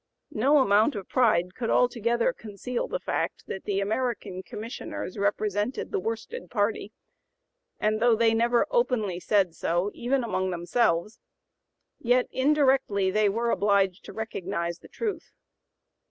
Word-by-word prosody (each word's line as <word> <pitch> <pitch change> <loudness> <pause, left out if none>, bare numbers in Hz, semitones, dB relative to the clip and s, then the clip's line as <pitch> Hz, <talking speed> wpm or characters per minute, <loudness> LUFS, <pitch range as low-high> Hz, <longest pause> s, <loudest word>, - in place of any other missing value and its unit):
No 275 +7 +4
amount 220 0 +4
of 195 -3 -6
pride 185 -8 +2
could 230 +1 -3
altogether 235 0 +2
conceal 225 +3 -5
the - - -3
fact - - -3
that 190 - -6
the 200 -1 0
American 210 -3 -2
Commissioners 210 0 -6
represented 205 +3 -1
the 410 - 0
worsted 230 - -5
party, 210 -1 -1 0.9
and 215 0 +1
though 235 0 +4
they 225 0 +3
never 235 +1 +3
openly 225 - +1
said 190 -2 +2
so 175 +4 -1
even 255 +2 0
among 190 -5 -1
themselves, 175 +2 0 0.8
yet 245 +1 +3
indirectly 265 -8 +2
they 210 +1 +3
were 230 +3 0
obliged 200 -2 +2
to - - -8
recognize 185 -5 -4
the - - -15
truth. 435 -3 -4
215 Hz, 135 wpm, -27 LUFS, 195-245 Hz, 0.9 s, No